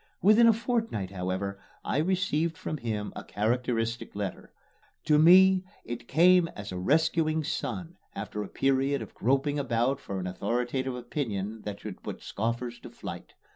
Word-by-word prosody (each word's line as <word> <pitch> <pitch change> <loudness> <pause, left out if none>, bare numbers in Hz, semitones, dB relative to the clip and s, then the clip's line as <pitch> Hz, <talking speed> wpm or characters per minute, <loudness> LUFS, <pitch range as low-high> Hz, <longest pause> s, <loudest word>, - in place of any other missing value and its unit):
Within 215 +4 +6
a - - +8
fortnight, 225 - -2
however, 95 +1 -3 0.3
I - - 0
received 170 -2 0
from 155 - -4
him 110 -5 -3
a - - -6
characteristic 115 +1 -1
letter. 100 -2 -5 0.5
To 150 -1 +4
me 185 +3 +7 0.2
it 120 0 -6
came 175 +4 +5
as 100 -2 -7
a 90 - -4
rescuing 160 - +2
sun, 175 +3 -4 0.2
after 105 - -4
a 105 - -4
period 135 -1 +1
of 105 - -12
groping 135 +5 +1
about 125 +1 +1
for 100 -7 -5
an 90 - -4
authoritative 120 +8 -1
opinion 110 -5 -3
that 105 -1 -5
should 105 -4 -7
put - - -7
scoffers 120 +2 -3
to - - -10
flight. - - -8
125 Hz, 155 wpm, -28 LUFS, 105-160 Hz, 0.5 s, a